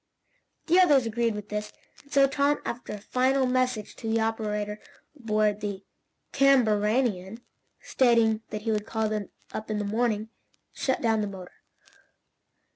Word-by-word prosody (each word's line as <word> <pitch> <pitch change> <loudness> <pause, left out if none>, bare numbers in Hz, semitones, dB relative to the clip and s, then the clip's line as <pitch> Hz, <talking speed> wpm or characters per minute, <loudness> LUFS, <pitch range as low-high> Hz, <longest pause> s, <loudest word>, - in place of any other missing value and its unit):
The 350 +3 +4
others 290 -9 +5
agreed 230 0 0
with 210 0 -7
this, 210 0 -4 0.3
and 280 - -25
so 275 -1 +5
Tom, 285 +1 +1
after 240 -2 -5
a - - -5
final 260 +5 +1
message 250 -4 -1
to 225 - -5
the 225 - +2
operator 210 -2 -2 0.4
aboard 215 -5 0
the 200 -2 -4 0.5
CAMBARANIAN 225 -5 +2 0.4
stating 230 -3 +3
that 210 0 -5
he 225 - 0
would 210 -1 -1
call 220 -1 -1
him 215 -2 -3 0.2
up 215 - -5
in 215 - -1
the 205 - -2
morning, 220 0 -1 0.4
shut 265 -1 -1
down 225 -2 +2
the 210 - -1
motor. 190 -2 -9
220 Hz, 150 wpm, -27 LUFS, 210-255 Hz, 0.5 s, others